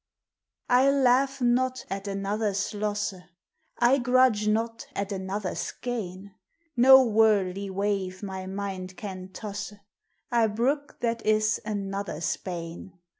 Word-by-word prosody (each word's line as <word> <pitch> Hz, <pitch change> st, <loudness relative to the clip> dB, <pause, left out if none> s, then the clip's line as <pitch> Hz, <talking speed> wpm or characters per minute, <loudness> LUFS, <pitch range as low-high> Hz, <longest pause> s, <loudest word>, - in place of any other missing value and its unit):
I 255 Hz, +2 st, +6 dB
laugh 270 Hz, 0 st, +3 dB
not 255 Hz, +1 st, +1 dB
at 195 Hz, +1 st, -5 dB
another's 200 Hz, +1 st, -1 dB
losse, 205 Hz, 0 st, -1 dB, 0.6 s
I 245 Hz, +3 st, +4 dB
grudge 250 Hz, -4 st, +3 dB
not 225 Hz, +2 st, -1 dB
at 200 Hz, +1 st, -3 dB
another's 190 Hz, 0 st, -3 dB
gaine; 200 Hz, -5 st, -5 dB, 0.4 s
No 265 Hz, +2 st, +8 dB
worldly 205 Hz, -4 st, +2 dB
wave 195 Hz, -1 st, -2 dB
my 190 Hz, -1 st, -5 dB
mind 190 Hz, -2 st, -5 dB
can 185 Hz, -3 st, -6 dB
tosse; 210 Hz, 0 st, -6 dB, 0.6 s
I 235 Hz, -2 st, +4 dB
brooke 265 Hz, +7 st, -1 dB
that 230 Hz, -1 st, -1 dB
is 215 Hz, +1 st, +2 dB
another's 200 Hz, -5 st, -2 dB
bane. 175 Hz, +1 st, -7 dB
210 Hz, 115 wpm, -27 LUFS, 195-240 Hz, 0.6 s, No